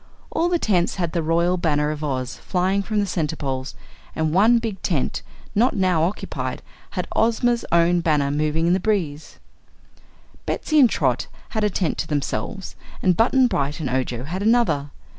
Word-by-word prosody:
All 340 +2 +1
the 350 - +2
tents 185 - +1
had 170 -4 -2
the 170 - 0
Royal 170 +3 +1
Banner 150 -3 +1
of 155 0 -5
Oz 130 -4 -2
flying 190 +2 0
from 215 +2 -3
the 205 - +2
centerpoles 140 -6 -3 0.4
and 160 -1 0
one 220 +6 +5
big 225 -5 -4
tent, 155 -8 -1 0.3
not 235 +5 +2
now 185 -5 +2
occupied, 180 +6 -3 0.3
had - - -1
Ozma's 235 +1 +2
own 170 +1 +4
banner 150 -4 +1
moving 155 +2 0
in 175 - +3
the 185 - +2
breeze. 170 -8 -2 1.1
Betsy 310 -1 +1
and 255 -4 +7
Trot - - 0 0.2
had 220 -2 -2
a 210 - +3
tent 185 -3 -1
to - - -2
themselves, 155 +7 -3 0.3
and 180 -2 +4
Button 255 +5 +4
Bright 145 - -1
and 140 -6 -3
Ojo 125 -2 -1
had 175 +7 -4
another. 205 -11 +2
175 Hz, 170 wpm, -22 LUFS, 150-210 Hz, 1.1 s, and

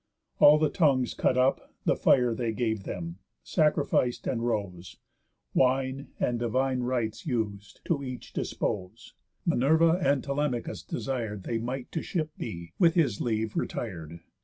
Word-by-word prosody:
All 150 +1 +8
the 155 -1 +2
tongues 135 -8 +2
cut 130 - +1
up, 130 +1 +1
The - - +3
fire 125 -3 +4
they 115 -1 -2
gave 110 -3 -1
them, 85 +1 -5 0.3
sacrific'd, 145 -6 +1
and 115 -3 -1
rose, 90 -7 -3 0.6
Wine, 130 +1 +1
and 120 -1 0
divine 130 +2 0
rites 120 0 -2
us'd, 105 -6 -3
to 145 -4 0
each 125 -2 -7
dispose; 105 +2 -3 0.3
Minerva 165 +3 +4
and 140 -1 +2
Telemachus 140 -4 -2
desir'd 115 -7 -4
They 115 +3 -2
might 125 +2 -4
to 160 - -2
ship 160 -4 -2
be, 85 -1 -7
with 170 -1 +5
his 140 - +2
leave, 110 -2 -1
retir'd. 85 -7 -4
125 Hz, 140 wpm, -28 LUFS, 110-140 Hz, 0.6 s, All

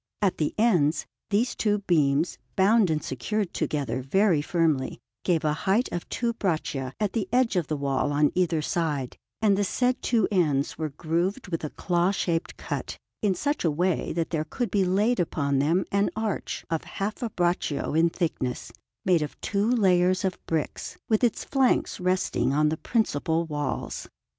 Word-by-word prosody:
At 195 -3 +1
the 150 - 0
ends, 180 -9 +3 0.2
these 220 +4 +1
two 210 -1 +1
beams, 150 -2 +2 0.2
bound 200 +1 +4
and 155 -1 0
secured 195 - -2
together 135 -4 -1
very 175 +4 +3
firmly, 155 -4 0 0.3
gave 165 -3 +1
a 150 - +2 0.2
height 225 +6 +3
of 175 - -4
two 235 -1 -1
braccia 155 - -2
at 210 -3 0
the 210 -5 -2
edge 245 -3 +2
of 175 -4 +1
the 155 - -2
wall 140 0 0
on 145 0 +3
each 170 -4 +1
side; 150 -7 -1 0.3
and 205 -2 +5
the 205 - +1
said 250 +5 0
two 230 -5 +2
ends 150 -7 +1
were 155 -1 -3
grooved 170 - -2
with 165 -2 -3
a 150 - -2
claw 175 +2 +1
shaped 170 -4 -1
cut, - - -4 0.2
in 200 -3 +2
such 290 +7 -1
a 170 - +3
way 175 +4 0
that 165 -1 -2
there 155 -2 0
could 235 +10 -3
be 200 -2 +3
laid 205 +5 +2
upon 140 -5 0
them 165 +7 +2
an 200 +1 +2
arch 220 -2 -3
of 165 - 0
half 205 +2 -4
a 235 - -1
braccio 175 -7 -1
in 165 +2 +4
thickness, 155 -8 -3 0.3
made 180 -3 +4
of 150 - -5
two 205 +2 0
layers 185 -5 +3
of 185 - -3
bricks, 160 -2 -3
with 220 +1 +2
its 240 - +2
flanks 270 -3 +1
resting 185 -6 +1
on 150 +1 +3
the 160 - -2
principal 165 -7 0
walls. 145 -3 -4
175 Hz, 175 wpm, -26 LUFS, 150-205 Hz, 0.3 s, and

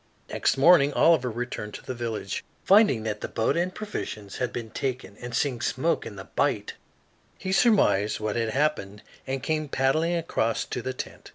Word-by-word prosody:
Next - - +1
morning 145 0 +6
Oliver 160 -7 +4
returned 115 -2 -5
to - - -10
the 130 - -4
village. 115 -4 -4 0.2
Finding 195 - +5
that 105 -1 -3
the - - -3
boat 110 - 0
and 175 +2 0
provisions 110 - -6
had 125 -2 -1
been 115 -2 -6
taken 125 -6 -4
and 120 -1 -6
seeing 125 -4 0
smoke 160 +7 0
in 105 - -9
the 95 - -8
bight, - - -1 0.6
he 190 - -4
surmised 190 - +3
what 105 -1 -2
had 115 -1 0
happened 110 -7 -1 0.2
and 135 0 -3
came 155 0 -1
paddling 155 +6 +1
across 135 -9 -1
to 125 - -4
the 130 +2 -3
tent. - - -8
130 Hz, 180 wpm, -26 LUFS, 110-155 Hz, 0.6 s, morning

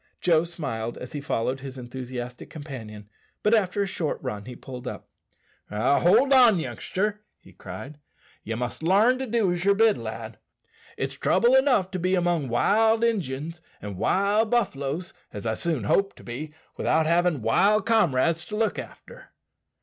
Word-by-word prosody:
Joe 165 -2 +3
smiled 130 -10 -5
as 125 - -8
he 145 - -4
followed 130 -1 -1
his 135 0 -8
enthusiastic 125 0 -7
companion, 115 -9 -9 0.4
but 210 - +3
after 205 -2 +2
a - - -1
short 170 -5 -2
run 105 -6 -4
he 125 0 -8
pulled 125 0 -9
up. - - -7 0.6
"Hold 140 - +4
on, 245 -6 +7
youngster," 205 +5 -3 0.2
he - - -18
cried; 145 +2 -9 0.4
"ye 115 - -4
must 125 +4 -4
larn 210 +10 +4
to 265 - -3
do 220 -5 +1
as 175 0 -2
ye're 200 0 +4
bid, 220 0 +4
lad. - - -7 0.6
It's - - -2
trouble 240 +2 +2
enough 255 -8 +3
to 185 - -3
be 185 +2 +1
among 175 -6 0
wild 220 - +3
Injuns 165 - -2 0.2
and 100 -2 -7
wild 200 - +2
buffaloes, 175 - -1 0.2
as 105 +1 -7
I 110 - +1
hope 110 - -3
soon 160 -9 -1
to 195 - 0
be, 140 +6 -6 0.3
without 160 0 +2
havin' 170 -5 +2
wild 200 - +3
comrades 170 - +2
to 210 - -6
look 220 -1 0
after." - - -11
170 Hz, 165 wpm, -25 LUFS, 130-210 Hz, 0.6 s, on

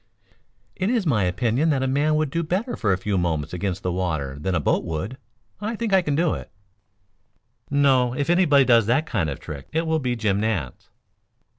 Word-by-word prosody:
"It 190 +2 -1
is 235 -5 +1
my 110 - +2
opinion 120 - +1
that 135 -3 +1
a - - 0
man 145 +3 +1
would 155 -2 0
do 170 - 0
better 190 +10 -2
for 105 -6 0
a 95 - +2
few 95 0 -1
moments 80 -3 -2
against 95 +1 -3
the 90 - -1
water 80 -7 -2
than 90 +4 -1
a - - +2
boat 75 - +1
would. 95 - -4 0.4
I 215 +3 -3
think 225 -2 -2
I 190 - +6
can 150 -5 -1
do 165 +1 +2
it." - - -7 1.2
"No, 135 -4 +3
if 145 0 -1
anybody 165 -6 +4
does 115 -4 +4
that 135 +7 +2
kind 95 - -1
of 70 - -4
a - - -24
trick 70 -3 -8
it 165 +1 0
will 160 0 +1
be 125 -3 -1
Jim 105 -4 0
Nance." 100 - -3
125 Hz, 210 wpm, -23 LUFS, 95-155 Hz, 1.2 s, I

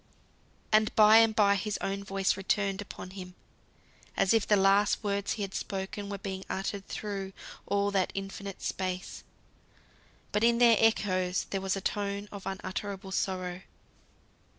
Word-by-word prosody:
And 215 0 +4
by 215 0 +8
and 225 -1 +5
by 200 -2 +5
his 205 +1 -2
own 195 0 -3
voice 195 -1 0
returned 195 0 0
upon 185 -2 -9
him, 180 -1 -9 0.8
as 195 - +3
if 225 -2 +2
the 210 - +5
last 200 +2 +3
words 200 -1 -1
he 210 - -3
had 195 -1 -5
spoken 200 +1 -4
were 200 - -4
being 190 -1 -5
uttered 195 +1 -3
through 195 -2 -5 0.3
all 200 0 +1
that 190 -2 +1
infinite 195 0 -6
space; 185 0 -4 1.1
but 210 +2 +1
in 235 0 +4
their 235 -2 +6
echoes 185 -5 +2
there 195 - -1
was 190 0 0
a 195 - -4
tone 200 +1 -2
of 200 -2 -8
unutterable 195 +1 -5
sorrow. 185 -2 -2
195 Hz, 150 wpm, -30 LUFS, 190-205 Hz, 1.1 s, by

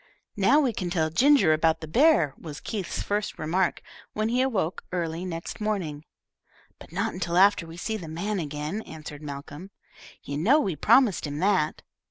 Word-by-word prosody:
"Now 210 +9 +4
we 265 -6 +1
can 180 -3 -3
tell 160 -3 0
Ginger 250 - +5
about 160 +1 +2
the 160 - -7
bear," 235 - +4
was 150 -3 -9
Keith's 200 -6 -4
first 205 0 -2
remark, 175 +4 0 0.3
when 215 +1 -1
he 245 +2 +2
awoke 205 -10 -1
early 170 -1 -3
next 170 +3 -6
morning. 175 -8 -2 0.7
"But - - -14
not 200 +6 -1
until 175 -1 -2
after 195 -3 +4
we 165 - -10
have 175 - -9
seen 220 -2 -3
the 165 - -7
man 190 +6 -3
again," 150 +5 -4
answered 155 -5 -9
Malcolm. 145 +4 -8 0.5
"You 140 +1 -4
know 250 - +4
we 195 - -1
promised 215 - +3
him 145 0 -5
that." 185 -3 +1
175 Hz, 180 wpm, -26 LUFS, 155-210 Hz, 0.7 s, Ginger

